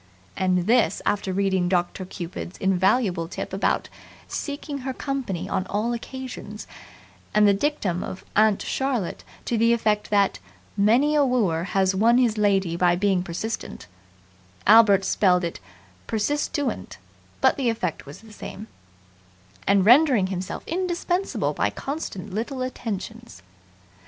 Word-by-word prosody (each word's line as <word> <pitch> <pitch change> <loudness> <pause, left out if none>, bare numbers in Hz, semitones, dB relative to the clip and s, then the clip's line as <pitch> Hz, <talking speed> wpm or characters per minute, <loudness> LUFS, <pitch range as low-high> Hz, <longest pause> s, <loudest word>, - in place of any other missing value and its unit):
And 185 -1 +1
this 225 -4 +2
after 200 -2 0
reading 190 -2 +1
"Doctor 180 +1 -1
Cupid's" 175 0 -7
invaluable 190 -1 +1
tip 185 - -6
about 195 - 0 0.4
"Seeking 285 0 -5
her 260 0 -4
company 240 - -3
on 185 -1 -2
all 215 +5 -1
occasions" 240 -3 -7 0.7
and 210 0 +6
the 200 - +5
dictum 200 - -1
of 190 - -7
"Aunt 215 -1 +4
Charlotte" 255 -9 -2 0.2
to 235 - 0
the 230 +1 +4
effect 215 -2 0
that 200 - +2 0.4
"Many 235 +9 +3
a 295 -1 +4
wooer 205 -11 +1
has 190 0 +1
won 225 +5 +4
his 240 -4 +3
lady 195 -4 +2
by 175 0 +3
being 190 0 +1
persistent" 185 - -5 0.8
Albert 205 -2 +6
spelled 180 -2 +3
it 170 - -4 0.5
"persistuent" 290 +5 -2 0.4
but - - +4
the 260 -4 0
effect 185 -8 -2
is 140 - -11
the 220 -1 -15
same 210 0 -8 1.0
"and 195 0 +4
rendering 250 -3 +6
himself 185 +2 -5
indispensable 355 +2 -1
by - - +1
constant 215 - -6
little 255 +5 -3
attentions". 200 - -6
205 Hz, 130 wpm, -24 LUFS, 185-250 Hz, 1.0 s, and